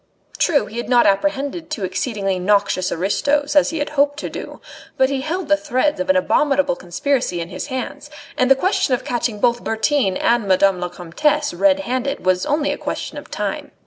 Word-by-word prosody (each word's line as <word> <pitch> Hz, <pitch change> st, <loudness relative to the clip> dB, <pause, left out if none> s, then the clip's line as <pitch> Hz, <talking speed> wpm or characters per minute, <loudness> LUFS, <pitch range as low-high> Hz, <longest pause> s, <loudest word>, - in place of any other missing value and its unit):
True, 300 Hz, -4 st, +3 dB
he 220 Hz, -, -9 dB
had 240 Hz, -, -4 dB
not 240 Hz, -2 st, +5 dB
apprehended 285 Hz, -, 0 dB
two 250 Hz, -10 st, -4 dB
exceedingly 190 Hz, 0 st, -2 dB
noxious 195 Hz, -1 st, +1 dB
aristos, 285 Hz, -, 0 dB
as 290 Hz, -, +5 dB
he 325 Hz, -, -4 dB
had 290 Hz, -, -2 dB
hoped 290 Hz, 0 st, +2 dB
to -, -, -5 dB
do; -, -, -8 dB, 0.4 s
but 265 Hz, +1 st, +3 dB
he 270 Hz, -1 st, -1 dB
held 330 Hz, +5 st, -3 dB
the 300 Hz, -, +4 dB
threads 300 Hz, 0 st, 0 dB
of 280 Hz, +1 st, -3 dB
an 280 Hz, -, +5 dB
abominable 280 Hz, -3 st, +2 dB
conspiracy 180 Hz, +3 st, -1 dB
in 170 Hz, 0 st, -5 dB
his 180 Hz, -, -6 dB
hands, 260 Hz, -2 st, -5 dB, 0.3 s
and 255 Hz, 0 st, +2 dB
the 270 Hz, -, +7 dB
question 275 Hz, -4 st, +1 dB
of 255 Hz, -, -8 dB
catching 240 Hz, -5 st, -2 dB
both 240 Hz, +1 st, +1 dB
Bertin 225 Hz, -3 st, +1 dB
and 235 Hz, -3 st, +1 dB
Madame 190 Hz, 0 st, +3 dB
la 180 Hz, -, -2 dB
Comtesse 290 Hz, -, -1 dB
red 290 Hz, -1 st, +3 dB
handed 260 Hz, -1 st, -3 dB
was 185 Hz, +3 st, +1 dB
only 295 Hz, 0 st, +1 dB
a -, -, -4 dB
question -, -, -4 dB
of -, -, -14 dB
time. -, -, -4 dB
260 Hz, 200 wpm, -20 LUFS, 200-290 Hz, 0.4 s, the